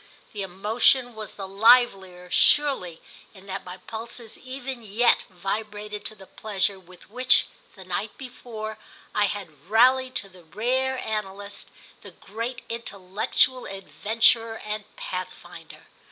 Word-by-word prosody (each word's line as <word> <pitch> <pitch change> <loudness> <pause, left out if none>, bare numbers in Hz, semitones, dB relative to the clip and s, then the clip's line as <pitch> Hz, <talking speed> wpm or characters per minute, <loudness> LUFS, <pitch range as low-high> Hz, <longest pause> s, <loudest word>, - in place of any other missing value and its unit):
The 205 - -4
emotion 220 +6 +2
was 215 -1 -7
the 195 -2 -5
livelier 195 -4 +4
surely 265 - +3 0.3
in 190 0 -14
that 195 0 -5
my 180 0 -8
pulses 225 +3 -6
even 260 -1 -6
yet 225 +3 +3
vibrated 210 +3 -4
to 215 - -1
the 195 -2 -13
pleasure 200 -2 -1
with 185 +1 -17
which, 250 +2 +4 0.3
the 190 -2 -11
night 190 +4 -3
before, 220 -4 -7 0.3
I 210 - +3
had 175 -6 -6
rallied 255 +3 +5
to 200 - +2
the 185 -2 -16
rare 255 +9 0
analyst, 205 -3 -4 0.3
the - - -9
great 230 +5 -6
intellectual 230 +3 0
adventurer 225 +4 +2
and 210 0 -3
pathfinder. - - -7
215 Hz, 125 wpm, -26 LUFS, 195-240 Hz, 0.3 s, rallied